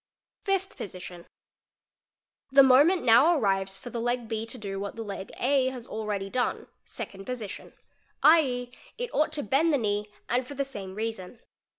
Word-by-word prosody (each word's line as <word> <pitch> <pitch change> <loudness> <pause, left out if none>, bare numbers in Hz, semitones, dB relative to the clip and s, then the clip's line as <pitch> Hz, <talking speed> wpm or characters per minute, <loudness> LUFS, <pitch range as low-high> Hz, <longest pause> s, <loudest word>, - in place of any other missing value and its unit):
Fifth 390 -1 0
Position—The 180 +8 -3
moment 285 +8 +5
now 275 +9 +6
arrives 195 -4 0
for 245 - -9
the 235 - -3
leg 240 0 -1
B 220 0 -3
to 250 - -7
do 195 -3 -5
iia; 200 0 -5
the 225 - -5
leg 200 -2 -7
A 265 0 +2
has 255 -3 -5
already 210 -4 -3
done 245 +5 -1 0.2
(Second 195 0 -7
Position), 240 -6 -6 0.5
2.e., 255 -6 +4 0.3
1t - - -3
ought 305 0 +2
to 300 - -1
bend 280 +10 +2
the 290 - +3
knee 210 -3 -1 0.2
and 250 +1 0
for 285 - -8
the 275 0 -1
same 195 -8 -7
reason. 220 -1 -5
240 Hz, 165 wpm, -27 LUFS, 205-275 Hz, 0.5 s, now